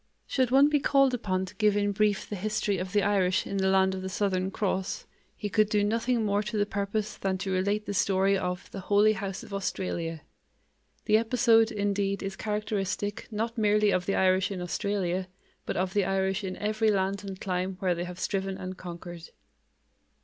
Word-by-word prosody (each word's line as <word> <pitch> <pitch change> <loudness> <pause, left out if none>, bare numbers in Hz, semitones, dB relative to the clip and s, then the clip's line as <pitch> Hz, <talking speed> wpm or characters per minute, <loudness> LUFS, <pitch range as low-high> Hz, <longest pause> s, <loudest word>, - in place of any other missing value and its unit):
Should 260 -3 +1
one 270 +3 +6
be 295 0 +2
called 275 -1 +3
upon 190 -6 -1
to 185 - -11
give 210 -2 +3
in 205 0 +1
brief 205 0 +1
the 210 - -4
history 210 0 -1
of 185 0 -4
the 205 0 +2
Irish 190 -2 +2
in 200 - -3
the 190 0 +2
land 190 0 +3
of 190 - -4
the 190 - -4
Southern 190 -1 0
Cross, 190 -1 -2 0.3
he 210 - -3
could 215 0 +2
do 210 -1 +2
nothing 230 +2 +1
more 205 0 +1
to 210 +1 -4
the 205 - +2
purpose 205 +1 -2
than 190 -1 -1
to 190 +1 -3
relate 200 +3 0
the - - -3
story 195 0 +2
of 180 -1 -3
the 195 - -6
"Holy 205 +3 +4
House 195 -2 -5
of - - -11
Australia." 170 -4 -3 0.8
The 215 -1 +5
episode, 225 -1 +4
indeed, 200 -1 -1
is 195 0 -4
characteristic, 210 0 -2
not 230 +2 -3
merely 210 -1 +3
of 180 -1 0
the 195 - +1
Irish 185 0 +3
in 195 -2 -4
Australia, 185 0 -1 0.4
but - - -2
of 185 +1 -1
the 205 - +2
Irish 190 +1 0
in 185 -1 -4
every 215 +1 +1
land 195 -1 0
and 195 -2 -7
clime 185 0 -2
where 185 -1 +1
they 175 +1 -3
have 180 0 -8
striven 195 -1 -2
and 185 0 -6
conquered. 175 -1 -9
200 Hz, 200 wpm, -28 LUFS, 190-210 Hz, 0.8 s, one